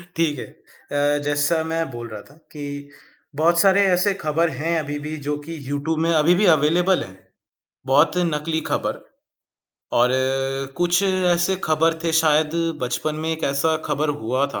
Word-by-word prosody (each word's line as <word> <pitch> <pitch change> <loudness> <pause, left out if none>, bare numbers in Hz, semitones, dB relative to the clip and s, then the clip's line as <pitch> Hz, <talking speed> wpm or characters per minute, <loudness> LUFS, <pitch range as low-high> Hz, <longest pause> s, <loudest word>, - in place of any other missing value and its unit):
ठीक 155 -4 0
है। - - -5 0.5
अ, 145 0 +1
जैसा 145 +3 +1
मैं 165 0 -2
बोल 120 -1 -7
रहा 110 -2 -8
था 140 - -19 0.2
कि 145 -1 -7 0.5
बहुत 170 +3 +3
सारे 195 +2 +5
ऐसे 180 +3 +2
खबर 165 -2 0
हैं 165 +2 0
अभी-भी 145 +1 -5
जो 150 0 -1
कि 165 +1 -7
यूट्यूब 145 +3 -2
में 165 +1 +1
अभी-भी 170 +5 +3
अवेलेबल 175 +5 +2
है, 95 0 -13 0.7
बहुत 145 +6 +3
नकली 160 -2 -1
खबर - - -2 1.0
और 120 +1 +5 0.7
कुछ 175 +1 +2
ऐसे 185 -1 +1
खबर 165 +1 +2
थे 165 - 0
शायद 155 -1 +3 0.3
बचपन 125 +5 -2
में 160 - -1
एक 160 0 -6
ऐसा 140 +3 +1
खबर 150 +2 -1
हुआ 130 +5 0
था - - -3
160 Hz, 155 wpm, -22 LUFS, 145-170 Hz, 1.0 s, सारे